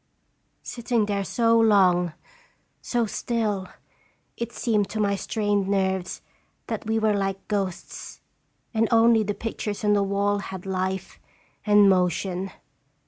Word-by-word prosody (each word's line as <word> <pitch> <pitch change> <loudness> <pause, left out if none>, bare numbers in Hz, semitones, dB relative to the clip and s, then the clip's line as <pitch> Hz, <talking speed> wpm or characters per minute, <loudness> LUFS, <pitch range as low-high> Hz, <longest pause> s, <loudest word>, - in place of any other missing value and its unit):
Sitting 235 -2 -1
there 200 -1 -1
so 230 +2 +2
long, 185 -6 +4 0.7
so 240 -2 0
still, 210 -3 -2 0.7
it 235 0 -4
seemed 215 -4 0
to 220 - -4
my 200 -1 +2
strained 205 -1 -1
nerves 190 -2 -1 0.4
that - - -5
we 220 0 +1
were 220 -1 +2
like 195 -1 -2
ghosts, 195 -4 -4 0.5
and 225 0 +2
only 230 -1 +5
the 205 -1 -2
pictures 215 -1 -4
on 210 0 +3
the 205 - +3
wall 200 +1 +1
had 190 -2 -7
life 190 0 -3 0.5
and 205 -1 +6
motion. 185 0 +1
205 Hz, 130 wpm, -25 LUFS, 190-220 Hz, 0.7 s, and